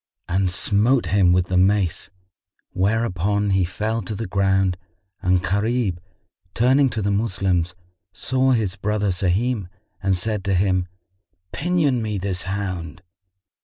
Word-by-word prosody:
and 95 +1 +1
smote 100 +8 +2
him 90 +1 +3
with 90 0 +3
the 90 +1 -1
mace, 95 -1 +1 0.6
whereupon 100 0 0
he 95 -1 +3
fell 110 +5 -2
to 110 - -5
the 115 +3 -4
ground 95 -1 +1 0.5
and 90 0 +2
Gharib, 100 +1 0 0.6
turning 130 +3 +4
to 110 -4 -3
the 100 - +1
Moslems, 95 -4 0 0.4
saw 130 +5 0
his 105 -6 0
brother 105 +1 -1
Sahim 95 +4 0 0.3
and 95 -1 +1
said 105 +1 -1
to 100 -1 +1
him, 95 -1 +1 0.6
"Pinion 150 -7 +1
me 105 -2 -2
this 95 -1 -2
hound." 90 -4 -4
100 Hz, 130 wpm, -22 LUFS, 90-110 Hz, 0.6 s, turning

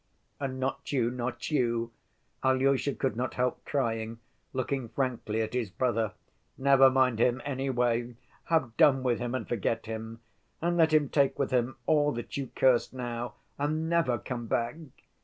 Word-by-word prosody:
"And 135 -2 -3
not 130 +1 -3
you, 120 -4 +1
not 125 +3 -4
you?" 115 -4 +1 0.5
Alyosha 135 +1 +2
could 135 -3 -1
not 125 +2 -2
help 125 0 -1
crying, 115 -5 -1 0.3
looking 130 -1 -2
frankly 115 -3 -1
at 110 - -5
his 120 -5 -1
brother. 115 0 0 0.4
"Never 135 0 +6
mind 130 -3 +2
him, 125 +2 +3
anyway; 125 -3 0 0.3
have 150 -9 +1
done 135 -3 +5
with 120 -3 +1
him 120 +1 -2
and 130 - -3
forget 115 0 -1
him. 110 0 -6 0.4
And 175 +1 0
let 160 -2 +4
him 155 -2 +4
take 140 0 +2
with 140 - -1
him 125 0 +1
all 150 -2 +3
that 120 - -6
you 135 -3 -3
curse 130 -3 +3
now, 120 -2 -4 0.2
and 155 +3 0
never 155 -8 +2
come 120 -2 -5
back!" 115 +3 0
125 Hz, 160 wpm, -29 LUFS, 120-135 Hz, 0.5 s, Never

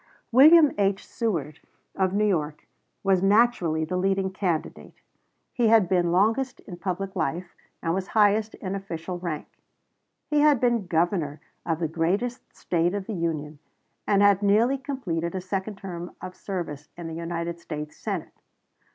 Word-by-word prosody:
William 300 +4 +8
H. 195 0 +1
Seward, 160 - -3 0.4
of 190 -1 +1
New 210 +2 +1
York, 155 -7 -1 0.4
was 190 -2 +3
naturally 195 -6 +3
the 180 +3 -2
leading 190 0 0
candidate. 185 -4 -3 0.6
He 240 -2 +2
had 220 -4 +5
been 175 -1 +2
longest 225 +8 +1
in 180 - -10
public 190 +2 -4
life, 175 +1 -3 0.3
and 165 - 0
was 190 +1 -2
highest 215 0 +2
in 190 -2 -5
official 180 -2 -5
rank. 170 -4 -4 0.8
He 300 -1 +1
had 295 -3 +5
been 235 -5 +1
Governor 165 -3 0 0.3
of 165 -2 +1
the 165 0 -1
greatest 195 +10 -2
State 175 +2 0
of 200 -2 -3
the 220 - -5
Union, 155 -4 -3 0.5
and 200 0 +4
had 200 -1 +5
nearly 225 +7 +3
completed 190 - -3
a - - -1
second 190 +2 -4
term 180 -2 -7
of 185 - -8
service 165 -7 -5
in 170 - -7
the 165 - -5
United 170 0 -4
States 150 -2 -6
Senate. - - -5
185 Hz, 155 wpm, -26 LUFS, 170-210 Hz, 0.8 s, William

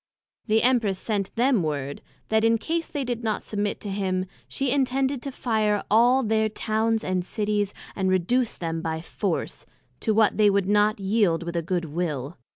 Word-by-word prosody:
The 220 0 +3
Empress 235 -6 +3
sent 200 -1 -3
them 245 -2 +3
word, 145 -3 -3 0.3
That 220 0 +2
in 230 0 +4
case 330 +7 -2
they 290 -2 -3
did 240 -2 -3
not 215 -2 -1
submit 205 -1 -2
to 205 - -5
him, 185 -2 -1 0.2
she 270 -2 -1
intended 270 0 +1
to 275 - -5
fire 215 -5 0
all 245 +4 +5
their 220 -1 +1
Towns 220 +1 0
and 185 -1 -1
Cities, 205 0 -1 0.2
and 190 -1 0
reduce 220 +7 +1
them 165 -1 -4
by 160 0 -3
force, 175 +1 -3 0.3
to 220 -3 0
what 220 -1 +3
they 210 -1 +5
would 200 -1 +1
not 210 +1 +3
yield 195 -4 +1
with 170 0 -5
a 170 - +1
good 175 +1 -2
will. 155 -2 -3
210 Hz, 180 wpm, -25 LUFS, 185-230 Hz, 0.3 s, all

